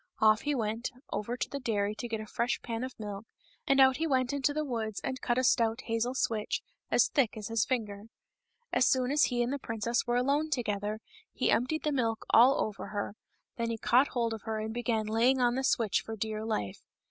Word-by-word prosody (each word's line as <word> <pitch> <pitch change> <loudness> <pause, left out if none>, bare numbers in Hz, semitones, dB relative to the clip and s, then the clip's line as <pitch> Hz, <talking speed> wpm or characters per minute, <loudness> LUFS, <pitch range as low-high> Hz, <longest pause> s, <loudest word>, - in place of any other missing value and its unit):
Off 215 0 +5
he 295 -1 -1
went 225 0 -2 0.2
over 230 +4 -3
to - - -2
the 280 - -5
dairy 210 -5 0
and 240 - -5
got 225 -1 -2
a 215 - -6
fresh 235 +3 -1
pan 230 0 -3
of 255 -2 -7
milk, 205 -1 -6 0.4
and 275 0 +4
out 265 -1 +6
he 325 +2 0
went 260 -2 +1
into 280 +1 +1
the 305 +1 -2
woods 225 -5 -3
and 260 0 -3
cut 240 - 0
a 255 - +2
stout 230 -1 +2
hazel 230 +1 -1
switch, 220 -5 -1 0.3
as - - +4
thick 255 -7 +1
as 210 0 -5
his 225 -3 +1
finger. 210 -5 -2 0.7
As 250 - +4
soon 255 0 +2
as 295 +1 +4
he 240 -1 0
and 245 +3 -2
the 285 - -3
princess 230 0 -2
were 240 0 +2
alone 280 +5 +1
together 215 -5 -2 0.3
he - - 0
emptied 255 +7 +1
the 300 - +1
milk 230 -5 -1
all 255 +5 +6
over 215 -2 -6
her; 205 -1 -4 0.4
then 230 -1 -1
he 230 - -2
caught 240 +6 +4
hold 235 -2 -1
of 220 - -6
her 220 0 -3
and 220 +1 -4
began 230 -2 -1
laying 235 +5 +3
on 245 -1 +3
the 265 +2 -1
switch 225 -6 +2
for 225 - -6
dear 215 0 -3
life. 105 - -3
235 Hz, 225 wpm, -30 LUFS, 220-255 Hz, 0.7 s, out